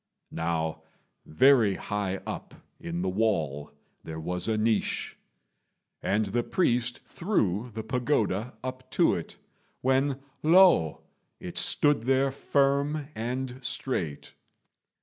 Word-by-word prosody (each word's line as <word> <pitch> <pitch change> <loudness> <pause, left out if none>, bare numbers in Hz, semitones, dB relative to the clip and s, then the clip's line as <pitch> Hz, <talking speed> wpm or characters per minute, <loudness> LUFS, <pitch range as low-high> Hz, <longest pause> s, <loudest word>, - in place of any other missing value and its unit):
Now 80 -1 -2 0.5
very 115 - +5
high 100 -2 -3
up - - -6 0.2
in 85 +1 -4
the - - -1
wall 80 -9 -1 0.3
there 80 0 -6
was 90 +2 -2
a 110 -1 +1
niche; 110 0 0 0.9
and 105 +2 +1
the 110 +5 0
priest 120 -5 0
threw 120 - -1
the 110 0 -5
pagoda 125 -4 0
up 130 0 -6
to - - +5
it, - - -5 0.4
when 135 +1 +1 0.2
lo! 165 - +5 0.4
it - - -4
stood 145 -6 +2
there 135 +1 +3
firm 140 +2 +1
and 125 +3 -4
straight. 95 - -3
115 Hz, 110 wpm, -28 LUFS, 95-135 Hz, 0.9 s, very